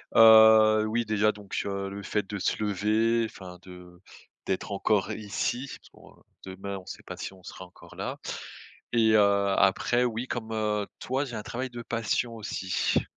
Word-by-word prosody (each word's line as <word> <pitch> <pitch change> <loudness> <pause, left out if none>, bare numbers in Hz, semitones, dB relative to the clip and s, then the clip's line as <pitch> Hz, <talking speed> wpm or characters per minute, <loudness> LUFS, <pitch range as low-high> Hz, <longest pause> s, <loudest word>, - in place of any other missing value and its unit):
Heu, 110 -1 +7
oui 115 +2 -1
déjà 105 0 +2
donc 100 -2 -5
heu, 100 -1 -3
le 100 +1 -7
fait 100 +2 -2
de 105 - -4
se 95 - -1
lever, 110 +3 +1
enfin 90 -4 -10
de 90 -1 -13 0.4
d'être 95 +2 -3
encore 100 0 +1
ici, 120 +5 -3
parce - - -21
qu'on - - -19 0.2
demain 95 +1 -6
on 95 - -12
sait - - -9
pas - - -8
si - - -6
on 95 -1 -17
sera 95 - -9
encore 90 0 -16
là - - -5 0.8
et 110 -2 +4
heu, - - +6 0.4
après 120 +5 +2
oui, 120 +1 -3
comme, 115 -3 -5
heu, 105 -1 -1
toi 130 +3 -1
j'ai 125 -4 -7
un - - -4
travail 130 +4 -4
de 120 -1 -8
passion 115 0 -2
aussi 95 -4 -1
105 Hz, 180 wpm, -27 LUFS, 100-115 Hz, 0.8 s, Heu